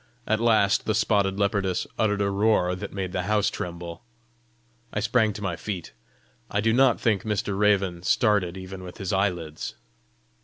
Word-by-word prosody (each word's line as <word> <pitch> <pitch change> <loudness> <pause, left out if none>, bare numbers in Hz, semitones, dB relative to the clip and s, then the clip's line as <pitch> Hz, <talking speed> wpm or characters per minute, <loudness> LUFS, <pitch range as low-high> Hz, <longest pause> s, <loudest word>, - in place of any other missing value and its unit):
At 110 0 +1
last 110 -4 +3
the 110 - +2
spotted 100 -3 +2
leopardess 100 -2 0
uttered 105 -2 +2
a 100 - 0
roar 100 -3 +2
that 90 - -6
made 95 -2 -4
the 90 - -1
house 105 -2 +2
tremble. 85 -1 -6 0.9
I - - -2
sprang 110 0 +2
to 105 0 -7
my 90 -3 -1
feet. 90 -4 -6 0.6
I 105 - 0
do 110 +2 +2
not 130 -1 +4
think 105 -5 +1
Mr. 105 -2 -2
Raven 100 -4 +2
started 95 -2 +2
even 95 0 -8
with 90 -1 -9
his 95 -2 -3
eyelids. 90 -5 -2
100 Hz, 165 wpm, -25 LUFS, 90-105 Hz, 0.9 s, not